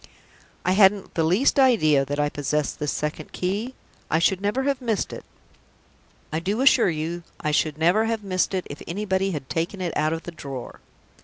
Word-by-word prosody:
"I 180 Hz, -, +3 dB
hadn't 195 Hz, 0 st, +4 dB
the 165 Hz, -, +1 dB
least 195 Hz, -, +3 dB
idea 155 Hz, -, +4 dB
that 145 Hz, +2 st, -3 dB
I 145 Hz, -, +2 dB
possessed 145 Hz, 0 st, -2 dB
this 150 Hz, -1 st, -1 dB
second 150 Hz, 0 st, -4 dB
key. 205 Hz, +8 st, -2 dB, 0.3 s
I -, -, +2 dB
should 185 Hz, +3 st, +2 dB
never 210 Hz, +7 st, 0 dB
have 275 Hz, -1 st, 0 dB
missed 225 Hz, -5 st, -1 dB
it. -, -, -8 dB, 1.1 s
I 160 Hz, -, +1 dB
do 200 Hz, +8 st, -1 dB
assure 260 Hz, -6 st, +5 dB
you 165 Hz, +2 st, -3 dB, 0.2 s
I 150 Hz, -, -1 dB
should 150 Hz, 0 st, +1 dB
never 175 Hz, +8 st, +3 dB
have 225 Hz, -1 st, -2 dB
missed 185 Hz, 0 st, 0 dB
it 185 Hz, -, -2 dB
if 145 Hz, -, -9 dB
anybody 195 Hz, +1 st, -1 dB
had 150 Hz, -7 st, -5 dB
taken 170 Hz, +5 st, -2 dB
it 180 Hz, -2 st, -3 dB
out 155 Hz, +1 st, +1 dB
of 165 Hz, -, -4 dB
the 175 Hz, -, -7 dB
drawer!" 140 Hz, -6 st, -8 dB
180 Hz, 190 wpm, -24 LUFS, 155-205 Hz, 1.1 s, assure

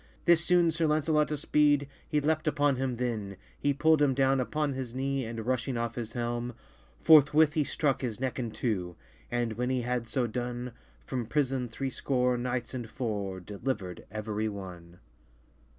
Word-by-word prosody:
This 170 Hz, -2 st, +5 dB
soone 175 Hz, -1 st, +4 dB
Sir 160 Hz, 0 st, +1 dB
Lancelot 150 Hz, 0 st, +2 dB
espyde, 145 Hz, -1 st, +3 dB, 0.2 s
He 150 Hz, -, +2 dB
leapt 155 Hz, +2 st, 0 dB
upon 145 Hz, -3 st, +2 dB
him 130 Hz, -1 st, -1 dB
then, 110 Hz, -5 st, -3 dB, 0.2 s
He 145 Hz, -, +2 dB
pull'd 155 Hz, +2 st, +3 dB
him 140 Hz, -3 st, +3 dB
downe 135 Hz, 0 st, +3 dB
upon 145 Hz, +3 st, -1 dB
his 130 Hz, -2 st, -5 dB
knee, 135 Hz, 0 st, -1 dB
And 115 Hz, -1 st, -5 dB
rushing 130 Hz, 0 st, -1 dB
off 115 Hz, 0 st, -2 dB
his 115 Hz, -2 st, -5 dB
helm, 120 Hz, 0 st, -3 dB, 0.4 s
Forthwith 155 Hz, -1 st, +6 dB
he 155 Hz, -, +2 dB
strucke 140 Hz, -1 st, 0 dB
his 120 Hz, -5 st, -3 dB
necke 130 Hz, -1 st, -2 dB
in 120 Hz, -2 st, -2 dB
two, 95 Hz, -7 st, -2 dB, 0.3 s
And, 120 Hz, -2 st, -1 dB
when 125 Hz, +3 st, -2 dB
he 130 Hz, -1 st, +1 dB
had 120 Hz, -1 st, -2 dB
soe 125 Hz, +2 st, 0 dB
done, 120 Hz, +1 st, -4 dB, 0.3 s
From 125 Hz, -4 st, -3 dB
prison 130 Hz, -2 st, 0 dB
threescore 125 Hz, 0 st, 0 dB
knights 125 Hz, 0 st, -2 dB
and 120 Hz, -3 st, -5 dB
four 105 Hz, -7 st, -3 dB
Delivered 100 Hz, -1 st, -4 dB
everye 110 Hz, 0 st, -2 dB
one. 90 Hz, -4 st, -9 dB
125 Hz, 165 wpm, -29 LUFS, 115-145 Hz, 0.4 s, Forthwith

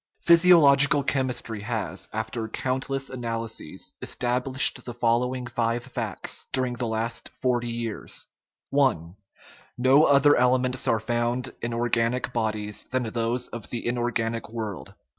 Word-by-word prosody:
Physiological 150 Hz, -5 st, +6 dB
chemistry 125 Hz, -6 st, -1 dB
has, 100 Hz, -5 st, -4 dB
after 110 Hz, +1 st, -4 dB
countless 135 Hz, +3 st, -3 dB
analy 115 Hz, -2 st, -3 dB
ses, 75 Hz, -, -7 dB
established 125 Hz, +2 st, +2 dB
the 120 Hz, -, -7 dB
following 125 Hz, +2 st, 0 dB
five 120 Hz, -1 st, -1 dB
facts 120 Hz, -6 st, -4 dB
during 130 Hz, -2 st, 0 dB
the 120 Hz, 0 st, -3 dB
last 115 Hz, +1 st, -3 dB
forty 120 Hz, -2 st, 0 dB
years: 115 Hz, -2 st, -4 dB, 0.5 s
I. 135 Hz, -8 st, +4 dB, 0.8 s
No 130 Hz, +5 st, +5 dB
other 145 Hz, +1 st, +5 dB
elements 125 Hz, +1 st, +2 dB
are 115 Hz, -3 st, +2 dB
found 120 Hz, +2 st, -1 dB
in 115 Hz, -, -3 dB
organic 120 Hz, +1 st, 0 dB
bodies 105 Hz, -2 st, -2 dB
than 130 Hz, 0 st, -2 dB
those 115 Hz, +2 st, -2 dB
of 120 Hz, -, -8 dB
the 120 Hz, -, -5 dB
inorganic 120 Hz, -2 st, -2 dB
world. 110 Hz, -4 st, -6 dB
120 Hz, 125 wpm, -25 LUFS, 115-130 Hz, 0.8 s, Physiological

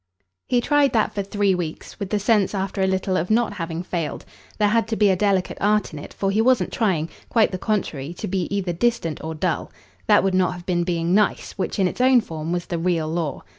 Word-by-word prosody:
He 245 Hz, -1 st, +2 dB
tried 285 Hz, 0 st, +3 dB
that 220 Hz, -2 st, +1 dB
for 200 Hz, -, -1 dB
three 200 Hz, 0 st, +1 dB
weeks, 175 Hz, +2 st, -5 dB
with 200 Hz, -3 st, -4 dB
the 210 Hz, -, +1 dB
sense 205 Hz, -1 st, +2 dB
after 195 Hz, 0 st, -2 dB
a 190 Hz, -, +3 dB
little 190 Hz, 0 st, 0 dB
of 180 Hz, 0 st, -1 dB
not 225 Hz, -1 st, +2 dB
having 165 Hz, -2 st, -4 dB
failed. 170 Hz, -4 st, -4 dB, 0.3 s
There 210 Hz, -1 st, +3 dB
had 225 Hz, +1 st, +2 dB
to 225 Hz, -, -1 dB
be 210 Hz, -2 st, +4 dB
a -, -, +2 dB
delicate 195 Hz, -1 st, 0 dB
art 210 Hz, -3 st, +1 dB
in 150 Hz, -, -6 dB
it, -, -, -9 dB
for 195 Hz, -1 st, -1 dB
he 215 Hz, +3 st, +2 dB
wasn't 235 Hz, -6 st, +2 dB
trying 180 Hz, -9 st, +1 dB, 0.2 s
quite 225 Hz, -2 st, +3 dB
the 185 Hz, -, -4 dB
contrary 165 Hz, -10 st, -2 dB
to -, -, -5 dB
be 185 Hz, -2 st, -1 dB
either 195 Hz, -3 st, -1 dB
distant 175 Hz, -5 st, -1 dB
or 160 Hz, 0 st, -4 dB
dull. 155 Hz, -, -2 dB, 0.4 s
That 210 Hz, -3 st, +5 dB
would 195 Hz, -1 st, +1 dB
not 185 Hz, -1 st, +2 dB
have 175 Hz, -1 st, -10 dB
been 175 Hz, -2 st, +1 dB
being 170 Hz, 0 st, 0 dB
"nice," 210 Hz, +1 st, +1 dB
which 190 Hz, -, -3 dB
in 190 Hz, -2 st, +3 dB
its 215 Hz, -, -4 dB
own 255 Hz, 0 st, +6 dB
form 160 Hz, -4 st, -5 dB
was 175 Hz, 0 st, -2 dB
the 170 Hz, -3 st, -3 dB
real 165 Hz, -2 st, 0 dB
law. 160 Hz, -3 st, -3 dB
190 Hz, 240 wpm, -22 LUFS, 175-210 Hz, 0.4 s, own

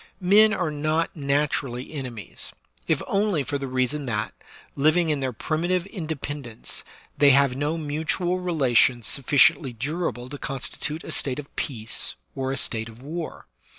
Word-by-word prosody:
Men 210 Hz, +4 st, +6 dB
are 175 Hz, -7 st, 0 dB
not 155 Hz, +2 st, 0 dB
naturally 140 Hz, -3 st, -1 dB
enemies, 125 Hz, -7 st, -5 dB, 0.4 s
if -, -, +1 dB
only 195 Hz, -7 st, +1 dB
for 140 Hz, +2 st, -2 dB
the 135 Hz, -, -3 dB
reason 130 Hz, +2 st, -1 dB
that, 105 Hz, -3 st, -1 dB, 0.4 s
living 155 Hz, +3 st, +3 dB
in 150 Hz, -, 0 dB
their 130 Hz, -1 st, -1 dB
primitive 170 Hz, +8 st, 0 dB
independence, 150 Hz, -, -5 dB, 0.4 s
they 145 Hz, -, +7 dB
have 140 Hz, -1 st, +5 dB
no 145 Hz, +4 st, -1 dB
mutual 160 Hz, +4 st, -1 dB
relations 130 Hz, -9 st, +3 dB
sufficiently 135 Hz, +1 st, +4 dB
durable 130 Hz, 0 st, -3 dB
to 145 Hz, 0 st, -7 dB
constitute 150 Hz, +3 st, -3 dB
a -, -, -6 dB
state 130 Hz, -2 st, -1 dB
of 145 Hz, -1 st, -8 dB
peace 115 Hz, -5 st, -2 dB, 0.2 s
or 135 Hz, -1 st, -2 dB
a 135 Hz, -, -2 dB
state 110 Hz, -2 st, +1 dB
of 115 Hz, +3 st, -14 dB
war. 160 Hz, +3 st, -5 dB
145 Hz, 150 wpm, -25 LUFS, 130-160 Hz, 0.4 s, they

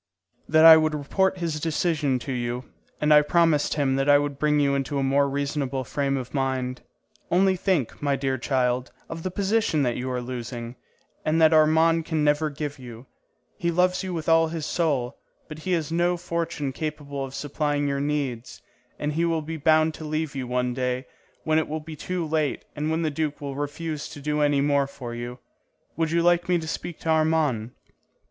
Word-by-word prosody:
"That 155 Hz, +1 st, +6 dB
I 160 Hz, -1 st, +11 dB
would 155 Hz, -1 st, +1 dB
report 190 Hz, +6 st, 0 dB
his 165 Hz, -3 st, -2 dB
decision 150 Hz, -3 st, 0 dB
to 135 Hz, -, -3 dB
you, 125 Hz, 0 st, -3 dB, 0.3 s
and 150 Hz, 0 st, +4 dB
I 150 Hz, -, +8 dB
promised 165 Hz, -1 st, +2 dB
him 135 Hz, -3 st, +1 dB
that 135 Hz, +1 st, +1 dB
I 145 Hz, -, +8 dB
would 145 Hz, -1 st, -2 dB
bring 150 Hz, -1 st, +2 dB
you 140 Hz, -1 st, +2 dB
into 140 Hz, +1 st, -1 dB
a 135 Hz, -, 0 dB
more 140 Hz, +1 st, +2 dB
reasonable 140 Hz, -1 st, -2 dB
frame 140 Hz, +2 st, -1 dB
of 125 Hz, -1 st, -6 dB
mind. 130 Hz, -2 st, -1 dB, 0.5 s
Only 190 Hz, +2 st, +3 dB
think, 180 Hz, -, -1 dB
my 145 Hz, -1 st, +1 dB
dear 135 Hz, -1 st, -1 dB
child, 125 Hz, 0 st, 0 dB, 0.2 s
of 165 Hz, 0 st, -6 dB
the 185 Hz, -, -2 dB
position 200 Hz, -4 st, +1 dB
that 120 Hz, -2 st, 0 dB
you 130 Hz, +1 st, -3 dB
are 125 Hz, -1 st, -2 dB
losing, 120 Hz, -1 st, -6 dB, 0.5 s
and 155 Hz, +1 st, +1 dB
that 160 Hz, 0 st, +6 dB
Armand 160 Hz, +1 st, +4 dB
can 160 Hz, -2 st, -1 dB
never 150 Hz, +1 st, +2 dB
give 145 Hz, -1 st, -5 dB
you. 120 Hz, -1 st, -10 dB, 0.5 s
He 170 Hz, -, 0 dB
loves 180 Hz, +2 st, +2 dB
you 190 Hz, -1 st, -4 dB
with 165 Hz, -3 st, -4 dB
all 165 Hz, 0 st, +5 dB
his 160 Hz, -2 st, -4 dB
soul, 140 Hz, -8 st, -1 dB, 0.3 s
but 155 Hz, -1 st, -9 dB
he 185 Hz, +3 st, -2 dB
has 160 Hz, -3 st, -1 dB
no 175 Hz, +1 st, +1 dB
fortune 170 Hz, -4 st, -3 dB
capable 145 Hz, -2 st, -4 dB
of 135 Hz, 0 st, -7 dB
supplying 145 Hz, 0 st, -1 dB
your 140 Hz, 0 st, -1 dB
needs, 140 Hz, -5 st, -3 dB, 0.4 s
and 150 Hz, 0 st, -2 dB
he 165 Hz, +3 st, 0 dB
will 165 Hz, -2 st, 0 dB
be 160 Hz, +2 st, -5 dB
bound 155 Hz, +1 st, +3 dB
to 160 Hz, -, -9 dB
leave 155 Hz, -1 st, -2 dB
you 130 Hz, -2 st, -3 dB
one 125 Hz, 0 st, 0 dB
day, 125 Hz, 0 st, -2 dB, 0.4 s
when 155 Hz, 0 st, +2 dB
it 160 Hz, -, -2 dB
will 155 Hz, +1 st, -3 dB
be 155 Hz, +1 st, -9 dB
too 180 Hz, +3 st, -3 dB
late 155 Hz, -2 st, -1 dB
and 150 Hz, +1 st, -2 dB
when 160 Hz, +1 st, 0 dB
the 155 Hz, -, 0 dB
duke 150 Hz, 0 st, -2 dB
will 140 Hz, -1 st, -5 dB
refuse 150 Hz, +1 st, -4 dB
to -, -, -9 dB
do 150 Hz, +1 st, -1 dB
any 145 Hz, -1 st, +3 dB
more 140 Hz, -1 st, +2 dB
for 125 Hz, -4 st, -8 dB
you. 120 Hz, +1 st, -6 dB, 0.6 s
Would 165 Hz, -1 st, 0 dB
you 170 Hz, +1 st, +1 dB
like 175 Hz, 0 st, +3 dB
me 180 Hz, -, +4 dB
to 160 Hz, -1 st, -5 dB
speak 170 Hz, +1 st, -5 dB
to 165 Hz, -, -3 dB
Armand?" 155 Hz, -8 st, +1 dB
150 Hz, 205 wpm, -25 LUFS, 135-160 Hz, 0.6 s, I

